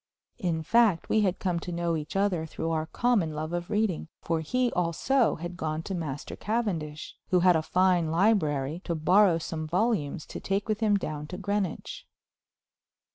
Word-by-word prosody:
In 165 Hz, -3 st, -1 dB
fact 215 Hz, -2 st, +3 dB
we 220 Hz, -, +3 dB
had 190 Hz, -3 st, +1 dB
come 180 Hz, -3 st, -1 dB
to 175 Hz, -, -6 dB
know 170 Hz, -1 st, -1 dB
each 150 Hz, +2 st, -5 dB
other 190 Hz, -5 st, +1 dB
through 165 Hz, +1 st, -3 dB
our 160 Hz, -1 st, -1 dB
common 200 Hz, -8 st, +1 dB
love 155 Hz, +2 st, -4 dB
of 175 Hz, 0 st, -3 dB
reading, 210 Hz, -6 st, 0 dB
for 165 Hz, -1 st, -1 dB
he 250 Hz, +9 st, 0 dB
also 180 Hz, -, +1 dB
had 175 Hz, +2 st, -6 dB
gone 155 Hz, -2 st, -3 dB
to 195 Hz, -, -5 dB
Master 150 Hz, -6 st, -4 dB
Cavendish, 180 Hz, -10 st, -3 dB
who 180 Hz, -3 st, +3 dB
had 180 Hz, -1 st, +5 dB
a 160 Hz, -, +2 dB
fine 180 Hz, -1 st, +2 dB
library, 160 Hz, -5 st, +1 dB
to 170 Hz, -, -1 dB
borrow 180 Hz, +3 st, +4 dB
some 160 Hz, -1 st, -4 dB
volumes 175 Hz, -5 st, 0 dB
to -, -, -7 dB
take 195 Hz, +2 st, -1 dB
with 215 Hz, -1 st, 0 dB
him 210 Hz, -3 st, +3 dB
down 150 Hz, -5 st, -5 dB
to 180 Hz, -, -6 dB
Greenwich. 200 Hz, -2 st, -3 dB
175 Hz, 180 wpm, -28 LUFS, 160-205 Hz, -, had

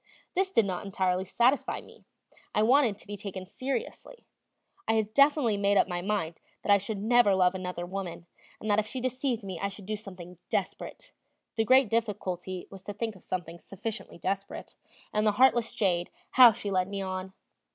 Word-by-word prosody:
This 380 Hz, +1 st, +1 dB
did 230 Hz, -, +4 dB
not 185 Hz, -1 st, -3 dB
entirely 190 Hz, -2 st, 0 dB
satisfy 245 Hz, +8 st, +2 dB
me; -, -, -16 dB, 0.5 s
I 210 Hz, -, +4 dB
wanted 240 Hz, -3 st, +4 dB
to -, -, -13 dB
be 205 Hz, -, -6 dB
taken 195 Hz, -2 st, -6 dB
seriously. 275 Hz, -, -5 dB, 0.6 s
I -, -, +3 dB
had 215 Hz, -1 st, 0 dB
definitely 280 Hz, -6 st, +4 dB
made 200 Hz, 0 st, +2 dB
up -, -, +4 dB
my 175 Hz, -1 st, -3 dB
mind 180 Hz, -4 st, -2 dB, 0.2 s
that -, -, +1 dB
I 200 Hz, -, +7 dB
should 200 Hz, +2 st, -4 dB
never 220 Hz, -1 st, +4 dB
love 180 Hz, -1 st, +4 dB
another 180 Hz, -2 st, -4 dB
woman, 180 Hz, -2 st, -6 dB, 0.3 s
and 215 Hz, -, -7 dB
that 205 Hz, -, +4 dB
if 215 Hz, -, -1 dB
she 260 Hz, -, -4 dB
deceived 255 Hz, -2 st, -1 dB
me 190 Hz, -3 st, -5 dB
I 200 Hz, -, 0 dB
should 200 Hz, 0 st, -9 dB
do 215 Hz, +2 st, -2 dB
something 180 Hz, -4 st, -10 dB
desperate -, -, -4 dB, 0.4 s
the 225 Hz, -, +1 dB
great 260 Hz, +1 st, +6 dB
difficulty 190 Hz, -5 st, -2 dB
was 195 Hz, -1 st, -10 dB
to 205 Hz, -, -5 dB
think 220 Hz, +1 st, -3 dB
of 190 Hz, -, -16 dB
something 175 Hz, -2 st, -5 dB
sufficiently 205 Hz, +1 st, -6 dB
desperate 195 Hz, +3 st, -4 dB, 0.4 s
and 215 Hz, +1 st, +2 dB
the 210 Hz, -, +3 dB
heartless 240 Hz, -1 st, +4 dB
jade, 175 Hz, -4 st, +1 dB, 0.2 s
how 250 Hz, -2 st, +9 dB
she 205 Hz, -1 st, -5 dB
led 185 Hz, -1 st, +1 dB
me 200 Hz, 0 st, -4 dB
on! 185 Hz, 0 st, -5 dB
200 Hz, 190 wpm, -29 LUFS, 185-225 Hz, 0.6 s, how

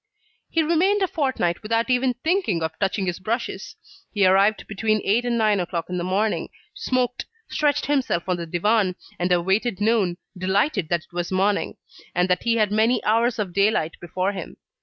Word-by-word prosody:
He 330 Hz, -, +2 dB
remained 370 Hz, +6 st, +2 dB
a -, -, +2 dB
fortnight 260 Hz, -, -1 dB
without 230 Hz, +1 st, 0 dB
even 250 Hz, 0 st, +2 dB
thinking 320 Hz, -, +1 dB
of 160 Hz, -, -1 dB
touching 195 Hz, 0 st, 0 dB
his 180 Hz, -1 st, -3 dB
brushes. 230 Hz, +6 st, -4 dB, 0.4 s
He 200 Hz, -2 st, +2 dB
arrived 195 Hz, +3 st, +3 dB
between 215 Hz, +1 st, 0 dB
eight 230 Hz, +5 st, +2 dB
and 240 Hz, -1 st, 0 dB
nine 215 Hz, -3 st, +2 dB
o'clock 175 Hz, -1 st, -3 dB
in 180 Hz, -, -1 dB
the -, -, -2 dB
morning, 200 Hz, +4 st, 0 dB, 0.2 s
smoked, 250 Hz, -1 st, -1 dB, 0.2 s
stretched 295 Hz, -2 st, +1 dB
himself 265 Hz, -12 st, 0 dB
on 180 Hz, -1 st, 0 dB
the 170 Hz, -1 st, -5 dB
divan, 185 Hz, +2 st, +1 dB, 0.2 s
and 180 Hz, +1 st, 0 dB
awaited 190 Hz, +5 st, +1 dB
noon, 205 Hz, -5 st, +1 dB, 0.2 s
delighted 190 Hz, -, 0 dB
that 175 Hz, -1 st, +1 dB
it 175 Hz, -, -24 dB
was 175 Hz, 0 st, -3 dB
morning, 195 Hz, +2 st, 0 dB, 0.4 s
and 180 Hz, +1 st, +2 dB
that 180 Hz, -, +2 dB
he 235 Hz, -1 st, +1 dB
had 215 Hz, -3 st, +2 dB
many 220 Hz, +4 st, +2 dB
hours 230 Hz, +3 st, +2 dB
of 200 Hz, -5 st, -3 dB
daylight 200 Hz, -5 st, +2 dB
before 185 Hz, +3 st, -1 dB
him. 195 Hz, -, -8 dB
205 Hz, 180 wpm, -23 LUFS, 180-235 Hz, 0.4 s, arrived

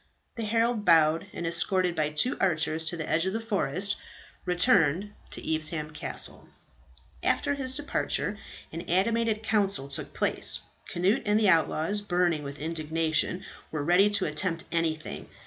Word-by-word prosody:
The 230 Hz, -2 st, -4 dB
herald 225 Hz, 0 st, +1 dB
bowed, 165 Hz, -3 st, +4 dB
and, 170 Hz, -, -5 dB
escorted 175 Hz, +1 st, +1 dB
by 155 Hz, -2 st, 0 dB
two 150 Hz, +12 st, +1 dB
archers 160 Hz, -3 st, +1 dB
to 170 Hz, +2 st, -2 dB
the 160 Hz, -, -4 dB
edge 165 Hz, +3 st, +1 dB
of 190 Hz, -, -1 dB
the 225 Hz, -, -1 dB
forest, 200 Hz, -, -1 dB, 0.5 s
returned 180 Hz, -, +2 dB, 0.2 s
to -, -, -7 dB
Evesham 155 Hz, 0 st, -2 dB
Castle. 150 Hz, -, -3 dB, 0.7 s
After 285 Hz, -, +2 dB
his 265 Hz, -2 st, -1 dB
departure, 285 Hz, -7 st, -1 dB, 0.4 s
an 165 Hz, -, -4 dB
animated 220 Hz, +4 st, +1 dB
council 200 Hz, -11 st, +1 dB
took 140 Hz, -, -5 dB
place. -, -, +2 dB, 0.3 s
Cnut 185 Hz, +5 st, +1 dB
and 210 Hz, +1 st, +3 dB
the 210 Hz, -3 st, +4 dB
outlaws, 165 Hz, +3 st, +2 dB
burning 175 Hz, -5 st, +1 dB
with 140 Hz, 0 st, -7 dB
indignation, 160 Hz, +2 st, 0 dB, 0.3 s
were 155 Hz, -2 st, -3 dB
ready 180 Hz, +6 st, +4 dB
to 205 Hz, -, +1 dB
attempt 170 Hz, -4 st, -1 dB
anything. 160 Hz, -2 st, -2 dB
175 Hz, 145 wpm, -28 LUFS, 160-205 Hz, 0.7 s, bowed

